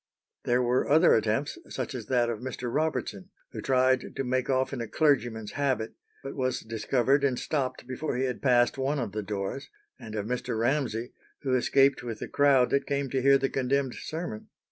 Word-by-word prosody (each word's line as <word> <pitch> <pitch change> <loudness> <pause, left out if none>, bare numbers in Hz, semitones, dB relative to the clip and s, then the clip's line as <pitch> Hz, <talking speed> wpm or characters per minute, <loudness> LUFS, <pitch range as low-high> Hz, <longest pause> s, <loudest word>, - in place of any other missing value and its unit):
There 125 +1 +2
were 125 +1 +1
other 160 +4 +6
attempts, 115 +7 0
such 130 -1 -4
as 120 -5 -6
that 120 -2 +2
of 115 -2 -3
Mr. 125 -1 -5
Robertson, 130 -11 -2 0.2
who - - -6
tried 130 0 +2
to 135 - -2
make 130 0 -1
off 130 +1 +1
in 125 - -3
a 115 - -4
clergyman's 120 -9 +1
habit, 130 -6 -1 0.3
but 135 - -6
was 130 -1 -1
discovered 120 +5 +1
and 135 -3 +2
stopped 135 -4 -2
before 130 +1 -3
he 130 - 0
had 125 -1 -2
passed 125 0 +3
one 140 +3 0
of 120 -6 -2
the 105 +2 -3
doors; 105 +6 -4 0.3
and 110 -3 -8
of 105 -1 -2
Mr. 125 -1 -2
Ramsay, 120 -1 -1 0.3
who 130 -2 0
escaped 135 +2 +3
with 115 -3 -5
the - - -6
crowd 140 -3 +3
that 140 0 +1
came 140 -2 -1
to 130 - 0
hear 140 +1 +6
the 135 0 0
condemned 135 0 0
sermon. 160 -9 -6
130 Hz, 195 wpm, -28 LUFS, 120-140 Hz, 0.3 s, other